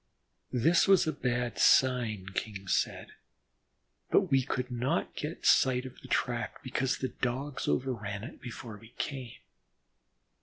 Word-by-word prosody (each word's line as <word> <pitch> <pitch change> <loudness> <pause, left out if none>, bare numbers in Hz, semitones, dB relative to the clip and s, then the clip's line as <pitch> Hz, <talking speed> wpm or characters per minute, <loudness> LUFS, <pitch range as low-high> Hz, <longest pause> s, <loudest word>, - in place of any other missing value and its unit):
This 155 - +3
was 195 -2 +6
a 155 - +1
bad 120 -2 -2
sign, 120 -7 +3
King 100 -1 -4
said, - - 0 1.0
but - - +3
we 135 -1 +5
could 125 0 -3
not 125 +7 -1
get 150 +3 -5
sight 130 -1 +4
of 130 - -10
the - - -11
track 120 -1 -1
because 130 0 -1
the 130 - -2
Dogs 130 +3 -3
overran 110 -6 -1
it 125 - -9
before 115 -2 -8
we 110 +2 -17
came. 130 -5 -4
125 Hz, 140 wpm, -30 LUFS, 115-135 Hz, 1.0 s, was